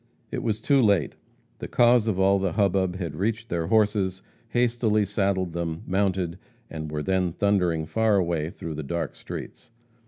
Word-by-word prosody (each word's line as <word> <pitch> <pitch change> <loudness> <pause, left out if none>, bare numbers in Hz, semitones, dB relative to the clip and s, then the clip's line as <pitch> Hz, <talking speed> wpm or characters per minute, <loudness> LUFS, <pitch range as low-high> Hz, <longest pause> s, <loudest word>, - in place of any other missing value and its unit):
It - - -3
was 110 -2 -1
too 140 -2 +3
late. 100 - +2 0.4
The - - -5
cause 120 -2 +4
of 100 -4 0
all 95 +1 +4
the 95 -3 -1
hubbub 95 -2 +1
had 85 -5 -4
reached 110 +5 -2
their 85 -1 -1
horses, 100 -3 +1 0.3
hastily 115 -3 +2
saddled 95 -3 -1
them, 85 -1 -3
mounted, 95 -2 0 0.3
and 80 -1 -5
were 75 -1 -3
then 95 -2 0
thundering 90 -6 +1
far 110 +5 +2
away 85 -4 0
through 85 -1 -7
the 75 - -4
dark 80 +1 -3
streets. - - -8
95 Hz, 165 wpm, -25 LUFS, 85-105 Hz, 0.4 s, cause